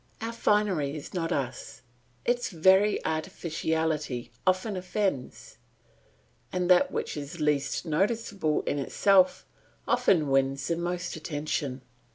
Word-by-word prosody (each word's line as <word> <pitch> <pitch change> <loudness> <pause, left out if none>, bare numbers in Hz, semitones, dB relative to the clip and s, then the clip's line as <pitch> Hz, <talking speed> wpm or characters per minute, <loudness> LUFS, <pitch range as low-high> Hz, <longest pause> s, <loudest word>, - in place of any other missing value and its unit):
Our 225 +1 -4
finery 200 -11 +1
is 150 - -8
not 170 -2 -2
us; 130 -3 -4 0.4
its 245 0 +1
very 190 +4 +4
artificiality 160 -5 -2 0.2
often 185 +3 +1
offends, 185 -6 -3 0.9
and 180 0 +1
that 180 - +5
which - - -3
is 150 +3 -7
least 150 +1 0
noticeable 195 -1 0
in 145 - -1
itself 185 +6 +3 0.4
often 155 -6 +3
wins 135 0 +1
the 170 - +2
most 175 +1 -3
attention. 145 -4 -3
165 Hz, 115 wpm, -28 LUFS, 145-190 Hz, 0.9 s, that